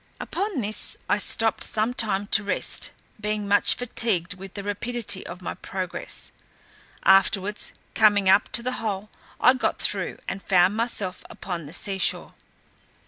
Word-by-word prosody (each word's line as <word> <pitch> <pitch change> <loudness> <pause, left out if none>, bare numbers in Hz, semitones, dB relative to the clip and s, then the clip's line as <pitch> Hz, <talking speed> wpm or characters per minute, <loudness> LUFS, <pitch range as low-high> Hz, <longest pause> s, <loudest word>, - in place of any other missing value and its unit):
Upon 385 - -2
this, 215 0 -3
I - - +2
stopped 225 -1 +1
some 220 +3 0
time 205 -4 0
to 210 +1 +4
rest, 205 - -1 0.3
being 210 -1 -1
much 205 +1 +5
fatigued 220 -7 -1
with 190 +1 -11
the 200 - -5
rapidity 205 0 -2
of 180 +1 -9
my - - -3
progress: 185 -2 -5 0.7
afterwards 195 +1 +3 0.2
coming 205 -3 +4
up 195 +2 +5
to 235 +2 +3
the 255 - -1
hole, 210 -1 -3 0.3
I 250 - +6
got 260 - -1
through, - - 0
and 195 - -4
found 185 +1 +3
myself 220 -5 -1
upon 170 -5 -6
the 150 - -10
sea 195 +1 -3
shore. - - 0
205 Hz, 150 wpm, -25 LUFS, 190-225 Hz, 0.7 s, I